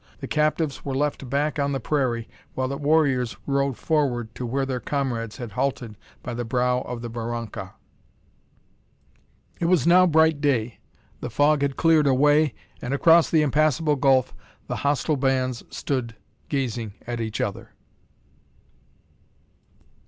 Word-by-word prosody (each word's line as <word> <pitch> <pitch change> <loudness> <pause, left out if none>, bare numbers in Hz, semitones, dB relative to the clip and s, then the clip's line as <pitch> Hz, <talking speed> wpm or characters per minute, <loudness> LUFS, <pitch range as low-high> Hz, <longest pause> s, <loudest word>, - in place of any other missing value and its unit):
The - - -6
captives 155 -1 0
were 135 -2 -3
left 140 -2 -2
back 145 +3 0
on 140 0 0
the 135 - -1
prairie, 120 -3 -1 0.3
while 130 0 -1
the 140 - -3
warriors 140 -5 +1
rode 140 -2 0
forward 125 -8 0
to 125 - -5
where 135 +3 -1
their 130 -2 -3
comrades 120 -6 -3
had 120 -3 -7
halted 125 -1 -2 0.3
by 120 - -5
the 120 +1 -3
brow 125 +1 +1
of 120 -2 -6
the - - -3
barranca. 115 -4 -5 1.8
It 170 - -1
was 175 -2 +3
now 180 +2 +6
bright 160 -2 +3
day; 120 -6 0 0.4
the - - -5
fog 145 0 +2
had 140 -1 -1
cleared 160 -3 +4
away, 145 +1 +3 0.3
and 135 +3 -2
across 165 +3 +5
the 155 -2 +3
impassable 150 +1 +2
gulf 135 -2 +2 0.3
the - - -4
hostile 145 +1 0
bands 130 -2 0
stood 125 -5 -3 0.3
gazing 120 -7 -2
at 120 -1 -4
each 110 -1 -4
other! 110 +2 -3
135 Hz, 145 wpm, -24 LUFS, 120-150 Hz, 1.8 s, now